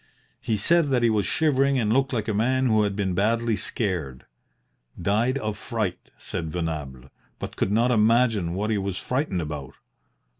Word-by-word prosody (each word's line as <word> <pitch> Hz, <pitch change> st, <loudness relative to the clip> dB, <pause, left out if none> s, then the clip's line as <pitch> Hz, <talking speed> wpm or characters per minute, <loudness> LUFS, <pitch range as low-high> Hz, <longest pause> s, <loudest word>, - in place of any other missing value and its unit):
He 110 Hz, -, -1 dB
said 165 Hz, +8 st, +3 dB
that 125 Hz, -3 st, +2 dB
he 115 Hz, -, +4 dB
was 105 Hz, -3 st, +1 dB
shivering 140 Hz, -2 st, +2 dB
and 110 Hz, -3 st, +1 dB
looked 135 Hz, +1 st, +2 dB
like 110 Hz, -5 st, -2 dB
a 110 Hz, -, 0 dB
man 130 Hz, +5 st, +1 dB
who 110 Hz, -3 st, +3 dB
had 100 Hz, -1 st, 0 dB
been 95 Hz, -2 st, -1 dB
badly 115 Hz, +4 st, +1 dB
scared. 85 Hz, -, -3 dB, 0.7 s
'Died 110 Hz, +9 st, +1 dB
of 110 Hz, -5 st, -4 dB
fright,' 110 Hz, -6 st, -3 dB
said 80 Hz, -2 st, -5 dB
Venables, 75 Hz, -6 st, -5 dB, 0.3 s
but -, -, -7 dB
could 95 Hz, -, 0 dB
not 115 Hz, +4 st, +3 dB
imagine 110 Hz, -5 st, +3 dB
what 105 Hz, +3 st, -1 dB
he 105 Hz, -, +1 dB
was 95 Hz, -1 st, -3 dB
frightened 125 Hz, -, -1 dB
about. 75 Hz, -3 st, -6 dB
110 Hz, 175 wpm, -25 LUFS, 95-120 Hz, 0.7 s, he